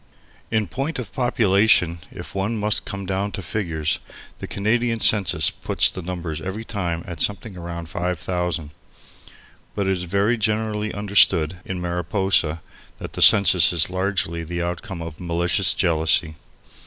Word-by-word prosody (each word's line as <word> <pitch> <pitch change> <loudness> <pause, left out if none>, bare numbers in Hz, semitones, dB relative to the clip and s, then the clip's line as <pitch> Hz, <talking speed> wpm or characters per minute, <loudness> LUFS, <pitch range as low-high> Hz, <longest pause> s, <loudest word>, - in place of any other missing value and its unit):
In 110 -1 +1
point 135 - -4
of 125 -5 -7
population, 100 -8 +2
if 85 - -9
one 100 +4 -2
must 105 0 -1
come 100 -1 -6
down 95 +2 -2
to 95 - -5
figures, 80 -5 -2 0.4
the - - -6
Canadian 115 +3 0
census 95 -8 +4
puts - - 0
the 95 - -7
numbers 85 -3 -5
every 100 +5 -5
time 85 -7 -3
at 85 -5 -6
something 105 +1 -1
round 85 -2 -7
five 90 +1 -3
thousand. 85 -2 -3 1.0
But 100 - -1
it 95 - +1
is 90 -1 -2
very 100 +6 +1
generally 110 0 -1
understood 95 -5 +2
in 95 -1 -4
Mariposa 90 -2 0 0.3
that - - -8
the - - -4
census 95 -6 +7
is 85 0 +1
largely 95 -3 -1
the 85 +1 -4
outcome 85 0 -5
of 80 -2 -9
malicious 85 -1 +2
jealousy. 80 -2 +2
95 Hz, 150 wpm, -22 LUFS, 85-105 Hz, 1.0 s, census